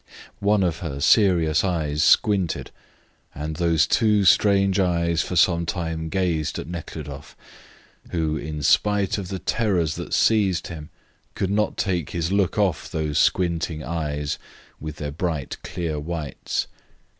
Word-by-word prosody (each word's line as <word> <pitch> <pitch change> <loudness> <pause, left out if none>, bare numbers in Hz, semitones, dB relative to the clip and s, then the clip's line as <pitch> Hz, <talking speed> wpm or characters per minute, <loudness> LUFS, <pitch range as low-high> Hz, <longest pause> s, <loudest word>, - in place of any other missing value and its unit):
One 100 0 +2
of 85 -3 0
her 75 -5 -5
serious 85 -3 +4
eyes 80 -5 -1
squinted, 95 -2 +2 0.6
and 75 +1 -5
those 85 -2 +3
two 105 -3 +2
strange 100 0 +4
eyes 85 -2 +1
for 90 - -4
some 85 0 +4
time 80 -2 -3
gazed 85 -4 -1
at - - -5
Nekhludoff, 75 -4 -8 0.7
who, 80 -2 -1
in 75 0 -5
spite 105 +5 +2
of 95 - -5
the 95 - -4
terrors 95 -7 0
that - - -3
seized 100 -6 +2
him, 80 -3 -8 0.5
could 95 - -1
not 105 +1 0
take 90 -4 -1
his 85 0 -2
look 100 -2 +1
off 95 -8 0
these 75 -2 -1
squinting 85 -3 +1
eyes, 75 -3 -3 0.4
with 75 0 -6
their 75 -2 -5
bright, 80 -2 -3
clear 85 -4 -4
whites. 80 -1 -3
85 Hz, 140 wpm, -23 LUFS, 80-95 Hz, 0.7 s, serious